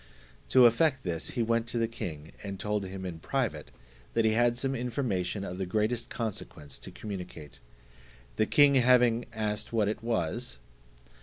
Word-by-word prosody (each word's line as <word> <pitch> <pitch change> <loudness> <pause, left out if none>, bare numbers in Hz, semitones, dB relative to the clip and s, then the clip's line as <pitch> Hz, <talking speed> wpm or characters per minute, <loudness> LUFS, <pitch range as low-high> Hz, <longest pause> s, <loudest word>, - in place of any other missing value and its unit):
To 130 -1 +7
effect 130 +3 +4
this, 85 -3 -2
he 120 - +3
went 115 0 +1
to 115 - -2
the 115 -1 +2
king, 80 -9 -6
and 100 -2 -6
told 105 -1 -1
him 95 0 -6
in 85 -3 -5
private, - - -2 0.5
that 115 -1 +3
he 110 - +4
had 120 +1 +3
some 135 +1 0
information 115 -7 -2
of 90 -1 -5
the 95 - -1
greatest 110 +4 0
consequence 85 - -5
to - - -9
communicate. 90 - -8 0.8
The 110 - +2
king 145 -1 +6
having 125 -2 +4
asked 105 -1 -2
what 110 -3 +2
it 110 +2 -2
was? 85 - -1
110 Hz, 165 wpm, -29 LUFS, 95-120 Hz, 0.8 s, To